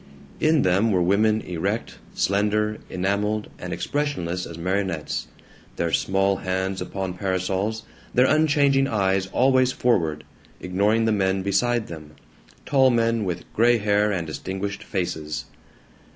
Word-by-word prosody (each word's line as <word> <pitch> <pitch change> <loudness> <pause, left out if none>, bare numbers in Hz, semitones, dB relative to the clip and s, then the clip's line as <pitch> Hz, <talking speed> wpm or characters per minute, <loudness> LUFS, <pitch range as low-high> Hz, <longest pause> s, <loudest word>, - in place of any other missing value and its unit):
In 155 -2 +3
them 95 +5 +3
were 90 -3 +2
women 105 +4 +3
erect, 85 -3 -3 0.2
slender, 105 +2 +1
enameled, 100 +3 -1
and - - -6
expressionless 90 - -2
as 85 - -9
marionettes, 90 -2 -2 0.5
their 85 -1 -1
small 95 0 +2
hands 95 +1 -2
upon 95 -2 -4
parasols, 95 +4 -2 0.3
their 125 - +4
unchanging 140 -2 +3
eyes 95 -3 +1
always 130 +4 +3
forward, 80 -13 0 0.4
ignoring 105 +5 +1
the 110 - +2
men 95 -2 +1
beside 110 +4 +1
them, 75 -2 -10 0.5
tall 135 -2 +4
men 115 -2 +1
with 90 -2 -3
gray 120 +2 +4
hair 105 0 +2
and 90 -4 -2
distinguished 95 +5 -5
faces. 80 -5 -3
100 Hz, 125 wpm, -24 LUFS, 95-115 Hz, 0.5 s, their